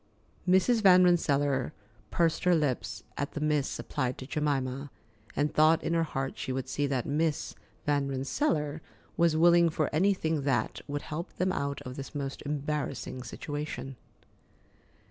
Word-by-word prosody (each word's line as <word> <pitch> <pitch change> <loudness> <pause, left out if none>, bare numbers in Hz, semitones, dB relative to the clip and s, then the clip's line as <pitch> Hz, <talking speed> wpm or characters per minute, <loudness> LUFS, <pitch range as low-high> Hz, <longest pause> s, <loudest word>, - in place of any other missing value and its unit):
Mrs. 220 +5 +4
Van 185 -2 +7
Rensselaer 145 -6 +2 0.4
pursed 165 0 +1
her 180 -1 +5
lips 105 - -1 0.2
at 145 - -2
the - - -3
"Miss" 150 -2 0
applied 130 -3 -2
to 130 - -7
Jemima, 140 -2 -1 0.5
and 145 +1 0
thought 160 +1 +4
in - - 0
her 165 - +3
heart 135 -4 -3
she 130 - -3
would 130 0 -3
see 145 +2 -1
that 130 -3 -1
"Miss 155 +1 0 0.3
Van 145 -1 +1
Rensselaer" 150 - -1 0.3
was 170 -2 +3
willing 170 +1 +6
for 155 -1 -1
anything 160 -3 +2
that, 135 -5 0
would 145 0 -3
help 170 +5 -5
them 185 +1 0
out 140 -1 -3
of 125 +1 -7
this 135 +2 -7
most 135 -1 -4
embarrassing 145 -3 -3
situation. 135 0 -5
145 Hz, 150 wpm, -29 LUFS, 135-165 Hz, 0.5 s, Van